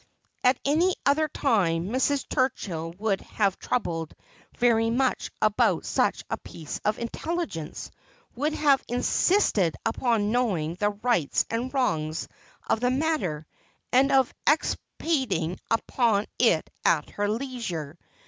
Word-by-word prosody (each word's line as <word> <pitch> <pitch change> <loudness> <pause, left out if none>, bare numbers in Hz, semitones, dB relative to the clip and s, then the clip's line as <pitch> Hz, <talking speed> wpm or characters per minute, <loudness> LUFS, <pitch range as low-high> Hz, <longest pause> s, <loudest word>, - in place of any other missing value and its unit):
At 250 0 +4
any 335 +6 +3
other 305 +2 +3
time 190 - +1
Mrs. 265 +3 0
Turchill 175 - -2
would 200 -2 0
have 200 -3 -1
troubled 165 -10 -2 0.4
very 225 -2 +3
much 255 +2 0
about 215 -1 +2
such - - +1
a - - -2
piece 155 -3 -8
of 210 +1 +1
intelligence, 235 - -4 0.4
would 295 +5 0
have 285 -3 +3
insisted 245 - +2
upon 225 -2 +1
knowing 195 -11 0
the 205 +4 0
rights 205 - +1
and 240 +3 -2
wrongs 160 - -1 0.4
of - - +2
the 250 +1 +2
matter, 255 - -1 0.5
and 265 +2 +4
of 265 -2 +3
expa 300 +2 +3 0.2
tiating 195 - -1
upon 225 -2 +1
it - - +3 0.2
at - - +2
her 205 0 -1
leisure. 215 - -4
230 Hz, 125 wpm, -26 LUFS, 180-265 Hz, 0.5 s, At